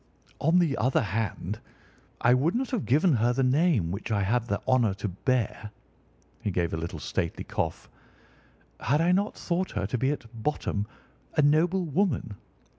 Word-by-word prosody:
On 160 Hz, +5 st, +3 dB
the 165 Hz, -6 st, +3 dB
other 125 Hz, +3 st, +2 dB
hand, 105 Hz, -1 st, -3 dB, 0.6 s
I 120 Hz, -, +5 dB
would 145 Hz, -, +2 dB
not 255 Hz, +1 st, -1 dB
have 245 Hz, -6 st, -1 dB
given 155 Hz, +7 st, +4 dB
her 120 Hz, +2 st, +2 dB
the 135 Hz, +2 st, +1 dB
name 130 Hz, -, +2 dB
which 100 Hz, +4 st, -5 dB
I 100 Hz, -2 st, +2 dB
have 115 Hz, +4 st, +1 dB
the 100 Hz, -3 st, -1 dB
honour 120 Hz, -6 st, +3 dB
to 105 Hz, +1 st, -3 dB
bear"—he 105 Hz, -, -4 dB
gave 85 Hz, -3 st, -1 dB
a -, -, -1 dB
little 85 Hz, +1 st, -4 dB
stately 80 Hz, +2 st, -3 dB
cough—"had 145 Hz, +4 st, -5 dB
I 170 Hz, +2 st, +3 dB
not 200 Hz, +3 st, +1 dB
thought 180 Hz, +1 st, -1 dB
her 100 Hz, -2 st, -1 dB
to 120 Hz, +5 st, -2 dB
be 130 Hz, -, +2 dB
at 145 Hz, -5 st, -3 dB
bottom 110 Hz, -4 st, -2 dB, 0.5 s
a 150 Hz, -, +4 dB
noble 170 Hz, +5 st, +3 dB
woman. 155 Hz, -, 0 dB
125 Hz, 165 wpm, -27 LUFS, 105-160 Hz, 0.6 s, I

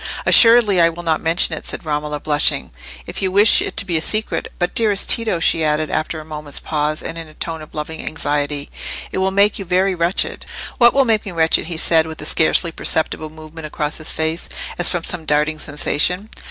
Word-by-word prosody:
"Assuredly 230 Hz, -6 st, +6 dB
I 165 Hz, -, +5 dB
will 170 Hz, +1 st, -8 dB
not 160 Hz, -2 st, 0 dB
mention 165 Hz, 0 st, +2 dB
it," -, -, -9 dB
said -, -, -4 dB
Romola, 150 Hz, -1 st, -3 dB
blushing, 150 Hz, 0 st, +1 dB, 0.3 s
"if -, -, -5 dB
you 190 Hz, -1 st, 0 dB
wish 205 Hz, +3 st, +5 dB
it -, -, -5 dB
to -, -, +1 dB
be 175 Hz, -4 st, -1 dB
a -, -, -1 dB
secret. 215 Hz, +6 st, -1 dB
But, 175 Hz, -1 st, -2 dB
dearest 210 Hz, -3 st, +1 dB
Tito," 225 Hz, -7 st, +2 dB
she 165 Hz, 0 st, +1 dB
added, 155 Hz, 0 st, 0 dB
after 155 Hz, +1 st, -2 dB
a 155 Hz, -, -10 dB
moment's 150 Hz, -2 st, -6 dB
pause, 150 Hz, 0 st, -2 dB
in 165 Hz, -, -6 dB
a 160 Hz, -2 st, -9 dB
tone 165 Hz, -1 st, -5 dB
of 155 Hz, -, -13 dB
loving 155 Hz, +1 st, -5 dB
anxiety, 145 Hz, -2 st, -3 dB, 0.4 s
"it -, -, -3 dB
will 190 Hz, 0 st, +1 dB
make 200 Hz, +2 st, +2 dB
you -, -, -4 dB
very 185 Hz, +2 st, +1 dB
wretched." 175 Hz, +2 st, -1 dB, 0.3 s
"What 240 Hz, 0 st, +5 dB
will 275 Hz, -1 st, +4 dB
make 220 Hz, -3 st, +1 dB
me 200 Hz, -, -7 dB
wretched?" 160 Hz, -1 st, +1 dB
he 170 Hz, -2 st, -4 dB
said, 160 Hz, 0 st, +4 dB
with 160 Hz, -1 st, -9 dB
a -, -, -7 dB
scarcely 165 Hz, +2 st, +2 dB
perceptible 155 Hz, 0 st, -1 dB
movement 155 Hz, 0 st, -10 dB
across 150 Hz, 0 st, -4 dB
his 155 Hz, -, -3 dB
face, 160 Hz, +1 st, -2 dB, 0.3 s
as 175 Hz, -, +5 dB
from 175 Hz, -2 st, -2 dB
some 175 Hz, -2 st, -1 dB
darting 150 Hz, +1 st, 0 dB
sensation. 155 Hz, +7 st, -1 dB
160 Hz, 210 wpm, -18 LUFS, 155-185 Hz, 0.4 s, Assuredly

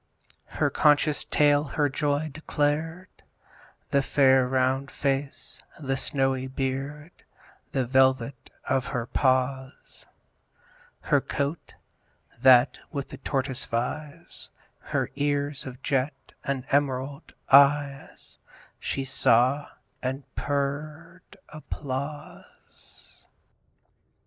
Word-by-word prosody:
Her -, -, +2 dB
conscious 150 Hz, 0 st, +3 dB
tail 145 Hz, -1 st, +3 dB
her 145 Hz, 0 st, 0 dB
joy 145 Hz, +2 st, -1 dB
declared; 155 Hz, +4 st, -2 dB, 0.8 s
The 140 Hz, -, +3 dB
fair 135 Hz, -2 st, +4 dB
round 130 Hz, +1 st, +1 dB
face, 140 Hz, 0 st, -3 dB, 0.2 s
the 135 Hz, -3 st, -1 dB
snowy 135 Hz, -1 st, 0 dB
beard, 135 Hz, +4 st, -4 dB, 0.6 s
The 130 Hz, -2 st, 0 dB
velvet 130 Hz, 0 st, +2 dB, 0.2 s
of 135 Hz, 0 st, 0 dB
her 125 Hz, -4 st, -2 dB
paws, 130 Hz, +1 st, -1 dB, 0.9 s
Her -, -, +2 dB
coat, 140 Hz, +4 st, -4 dB, 0.6 s
that 125 Hz, 0 st, +6 dB
with 140 Hz, -3 st, -4 dB
the -, -, -9 dB
tortoise 135 Hz, -2 st, -2 dB
vies, 145 Hz, +7 st, -5 dB, 0.3 s
Her -, -, -2 dB
ears 145 Hz, 0 st, -1 dB
of 125 Hz, -1 st, -10 dB
jet, 135 Hz, +1 st, -2 dB
and 135 Hz, -2 st, -2 dB
emerald 140 Hz, +1 st, -1 dB, 0.2 s
eyes, 140 Hz, 0 st, +3 dB, 0.4 s
She 135 Hz, -, -3 dB
saw; 130 Hz, +2 st, +3 dB, 0.3 s
and 130 Hz, +2 st, -3 dB
purr'd 150 Hz, +5 st, -4 dB
applause. 145 Hz, -1 st, -8 dB
140 Hz, 90 wpm, -26 LUFS, 130-145 Hz, 0.9 s, that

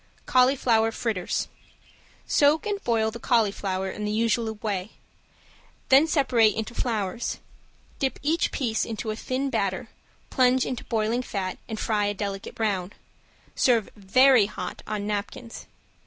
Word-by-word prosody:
~CAULIFLOWER 250 Hz, -3 st, +3 dB
FRITTERS~ 215 Hz, -7 st, -2 dB, 0.8 s
Soak 295 Hz, +2 st, +3 dB
and 410 Hz, -1 st, -2 dB
boil 220 Hz, -2 st, +1 dB
the 235 Hz, -, -8 dB
cauliflower 200 Hz, -5 st, 0 dB
in 210 Hz, -, -6 dB
the 210 Hz, -, -1 dB
usual 225 Hz, 0 st, 0 dB
way, 205 Hz, -2 st, -4 dB, 1.0 s
then 275 Hz, +4 st, +6 dB
separate 250 Hz, -8 st, +3 dB
into 225 Hz, +2 st, -4 dB
flowers. 220 Hz, -3 st, -2 dB, 0.6 s
Dip 265 Hz, -1 st, -1 dB
each 320 Hz, +3 st, +1 dB
piece 230 Hz, -5 st, -1 dB
into 220 Hz, -1 st, -4 dB
a -, -, -3 dB
thin 265 Hz, +4 st, -2 dB
batter, -, -, -1 dB, 0.4 s
plunge 255 Hz, 0 st, +3 dB
into 250 Hz, -, -4 dB
boiling 225 Hz, +1 st, 0 dB
fat 195 Hz, -6 st, -4 dB
and 220 Hz, -1 st, -4 dB
fry 210 Hz, -2 st, 0 dB
a 205 Hz, -, -2 dB
delicate 195 Hz, -1 st, -5 dB
brown. 200 Hz, -4 st, -1 dB, 0.6 s
Serve 235 Hz, -5 st, +2 dB
very 235 Hz, +3 st, +5 dB
hot -, -, -6 dB
on 210 Hz, -1 st, -3 dB
napkins. 210 Hz, +3 st, -5 dB
225 Hz, 135 wpm, -26 LUFS, 210-255 Hz, 1.0 s, then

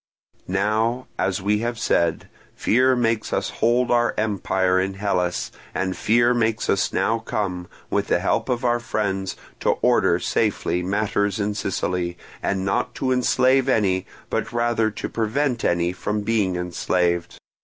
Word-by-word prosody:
"Now, 110 Hz, +6 st, 0 dB
as 95 Hz, 0 st, 0 dB
we 105 Hz, +1 st, +2 dB
have 120 Hz, +1 st, -2 dB
said, 85 Hz, -6 st, +1 dB, 0.3 s
fear 130 Hz, +3 st, +3 dB
makes 115 Hz, -2 st, 0 dB
us -, -, -1 dB
hold 120 Hz, +2 st, +3 dB
our 120 Hz, 0 st, +2 dB
empire 95 Hz, -3 st, +1 dB
in 95 Hz, +1 st, -1 dB
Hellas, 90 Hz, -3 st, -1 dB, 0.2 s
and 95 Hz, 0 st, -1 dB
fear 120 Hz, +2 st, +3 dB
makes 115 Hz, -2 st, +1 dB
us 100 Hz, +1 st, +1 dB
now 115 Hz, +1 st, +1 dB
come, 95 Hz, -5 st, -3 dB, 0.2 s
with -, -, 0 dB
the -, -, +3 dB
help -, -, 0 dB
of 125 Hz, 0 st, -1 dB
our 120 Hz, 0 st, +2 dB
friends, 95 Hz, -5 st, -2 dB, 0.2 s
to -, -, +2 dB
order -, -, +4 dB
safely 90 Hz, -, 0 dB
matters 100 Hz, +2 st, 0 dB
in 105 Hz, 0 st, 0 dB
Sicily, 90 Hz, -3 st, -2 dB, 0.2 s
and 95 Hz, -1 st, -1 dB
not 120 Hz, +5 st, -1 dB
to 130 Hz, -1 st, -1 dB
enslave 130 Hz, +1 st, +3 dB
any 95 Hz, -6 st, +1 dB, 0.2 s
but 115 Hz, -, -1 dB
rather 120 Hz, -2 st, +1 dB
to 105 Hz, -, -5 dB
prevent 120 Hz, +3 st, -1 dB
any 85 Hz, 0 st, +1 dB
from 105 Hz, +3 st, -2 dB
being 105 Hz, -4 st, +1 dB
enslaved. 90 Hz, -1 st, -1 dB
105 Hz, 150 wpm, -23 LUFS, 95-120 Hz, 0.3 s, order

